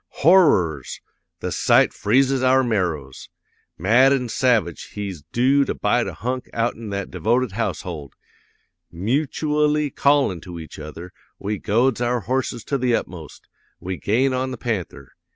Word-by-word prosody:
Horrors! 95 - +4 0.4
the - - -3
sight - - +3
freezes 130 +4 +2
our 130 +1 +4
marrows! 85 - -2 0.5
Mad 120 - +4
an' 125 -3 0
savage, 115 - +1
he's 100 -6 -5
doo 135 +4 +3
to - - -3
bite - - +1
a - - -5
hunk 125 +3 -4
outen 115 -1 -2
that 100 -1 -4
devoted 120 +1 0
household! 90 -8 -4 0.8
Mutooally 150 - 0
callin' 140 - +2
to 85 0 -9
each 80 -1 -10
other, 80 +4 -9 0.2
we 105 +1 -4
goads 120 +3 +1
our 120 0 0
horses 125 0 -2
to 140 - -2
the 125 -1 +2
utmost. 80 - -7 0.3
We 90 +1 -5
gain 120 - +1
on 130 +1 -1
the 130 - -6
panther! 90 - -4
115 Hz, 140 wpm, -22 LUFS, 90-130 Hz, 0.8 s, Horrors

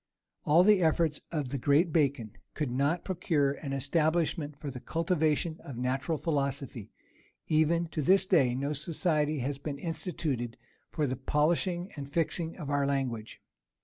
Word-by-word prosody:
All 160 +4 +6
the 205 -1 +5
efforts 160 -2 +2
of 150 -6 -2
the 140 +1 -3
great 150 +6 +3
Bacon 140 -8 +1 0.2
could 150 -5 -2
not 140 +7 0
procure 165 -6 +1
an 140 0 -6
establishment 150 +1 0
for 145 -1 -6
the 125 - -7
cultivation 160 0 0
of 135 -4 -9
natural 130 +6 -1
philosophy: 140 - -2 0.6
even 160 +2 +2
to 155 - -2
this 190 +6 +5
day, 140 -11 +3
no 140 +3 -1
society 155 0 0
has 135 +2 -3
been 140 0 -5
instituted 145 - -3 0.3
for 150 - -1
the 130 -1 -1
polishing 175 +6 0
and 140 -1 -7
fixing 165 +1 -1
of 155 -6 -6
our 140 -1 +1
language. 130 -6 -3
150 Hz, 150 wpm, -30 LUFS, 140-165 Hz, 0.6 s, All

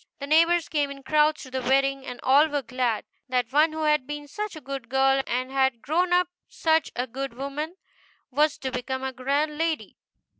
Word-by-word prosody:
The 280 - -5
neighbors 330 +3 +4
came 290 -2 0
in 275 -1 -9
crowds 305 +1 +2
to 260 - -11
the 260 0 -2
wedding, 270 +1 +1
and 250 - -6
all 280 +4 +5
were 290 -2 -2
glad 245 -2 -1 0.2
that 250 -1 0
one 305 +2 +5
who 315 0 -3
had 300 -4 +2
been 295 0 -6
such 420 +6 -5
a - - -7
good 270 -4 -7
girl, 270 +1 +3
and 255 +2 -2
had 265 -3 +1
grown 350 +6 +1
up 355 0 +4 0.2
such 320 -2 +1
a 250 - -1
good 265 0 -5
woman, 285 +6 -4 0.6
was 295 +3 +2
to 260 - -4
become 260 +1 -3
a 265 0 -3
grand 285 +4 -1
lady. 325 -1 -2
275 Hz, 200 wpm, -26 LUFS, 260-310 Hz, 0.6 s, all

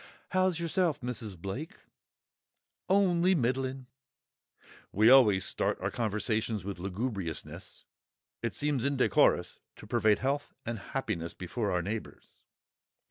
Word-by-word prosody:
"How's 185 -2 +2
yourself, 170 -2 +1
Mrs. 115 -6 -5
Blake?" 110 - -5 1.1
"Only 185 -2 +4
middling." 130 -1 -1 1.1
(We 110 +4 +5
always 105 -8 +6
start - - -1
our - - -2
conversations 110 -2 -1
with 100 -2 -5
lugubriousness; 95 -2 -4 0.6
it 115 - -2
seems 145 -4 0
indecorous 140 -2 +2 0.2
to - - -12
parade 105 -1 +3
health 140 +4 -2
and 120 -2 -3
happiness 100 -8 -4
before 105 +4 -3
our 90 -2 0
neighbours!) 105 +4 -6
120 Hz, 110 wpm, -30 LUFS, 100-140 Hz, 1.1 s, always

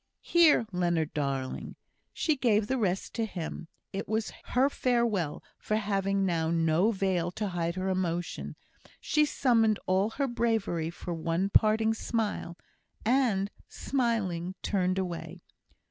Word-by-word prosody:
Here, 335 -8 +5
Leonard, 175 -4 0
darling!" 135 -3 -3 0.4
She 310 - +1
gave 220 -6 +2
the 260 +4 -1
rest 190 -3 -1
to 225 -1 -1
him. 170 -3 -6 0.3
It 195 +1 -4
was 220 0 -1
her 255 +2 +3
farewell; 235 - 0 0.2
for 215 - -1
having 195 -2 0
now 165 -3 0
no 165 +4 +3
veil 190 -5 0
to 210 0 -2
hide 170 -1 -2
her 185 0 -2
emotion, 175 -2 -2 0.4
she 300 0 +2
summoned 230 -7 +3
all 190 +3 +2
her 275 +4 -1
bravery 225 -9 0
for 175 +1 -6
one 170 +4 -1
parting 220 +1 +4
smile, 220 -6 -2 0.5
and, 220 -5 +2 0.2
smiling, 200 -9 -1
turned 185 -2 +1
away. 180 -3 -4
195 Hz, 130 wpm, -29 LUFS, 175-225 Hz, 0.5 s, Here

